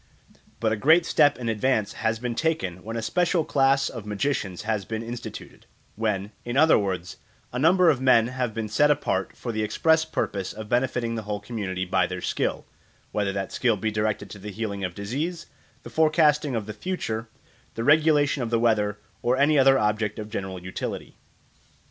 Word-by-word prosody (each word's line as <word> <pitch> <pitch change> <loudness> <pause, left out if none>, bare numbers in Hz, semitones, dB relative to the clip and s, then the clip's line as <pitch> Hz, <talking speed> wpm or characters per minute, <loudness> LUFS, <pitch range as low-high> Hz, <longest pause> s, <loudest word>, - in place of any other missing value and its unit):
But 110 -2 +1
a - - +2
great 160 +9 +5
step 145 - +4
in 120 - -5
advance 110 -1 0
has 110 0 -1
been 120 +1 -3
taken 115 - -2
when 115 +2 -5
a 115 - -3
special 175 +4 +1
class 135 0 +3
of 115 -4 -6
magicians 105 -3 -2
has 105 -2 -1
been 110 +3 -4
instituted; 120 +1 -8 0.3
when, 105 -2 -1
in 120 +2 -3
other 155 +2 +6
words, 95 -4 -2 0.4
a 125 - -2
number 175 +3 +5
of 130 -4 -2
men 130 -4 +5
have 125 -2 -2
been 110 0 -4
set 145 +8 +3
apart 135 -10 0
for 120 - -4
the 110 -1 -2
express 160 +9 +2
purpose 100 -11 -3
of 110 0 -8
benefiting 120 -1 0
the 115 - -3
whole 105 -1 -4
community 100 -4 -4
by 90 - +1
their - - -5
skill, - - -2 0.5
whether 100 -2 0
that 95 0 -4
skill 115 -4 +1
be 110 +2 -1
directed 105 -2 -2
to 105 - -9
the 105 +2 -7
healing 100 -1 -4
of 90 -2 -3
diseases, 150 - -3 0.4
the - - -10
forecasting 155 -3 +3
of 110 -3 -2
the 105 - -6
future, 110 - -4 0.5
the 115 - -3
regulation 145 -1 +4
of 120 - -2
the 115 - +2
weather, 105 -3 +1 0.2
or 125 +2 +1
any 145 +1 +4
other 135 0 +6
object 105 -1 0
of 105 0 -7
general 95 -2 -4
utility. 90 +1 -6
115 Hz, 190 wpm, -25 LUFS, 105-140 Hz, 0.5 s, other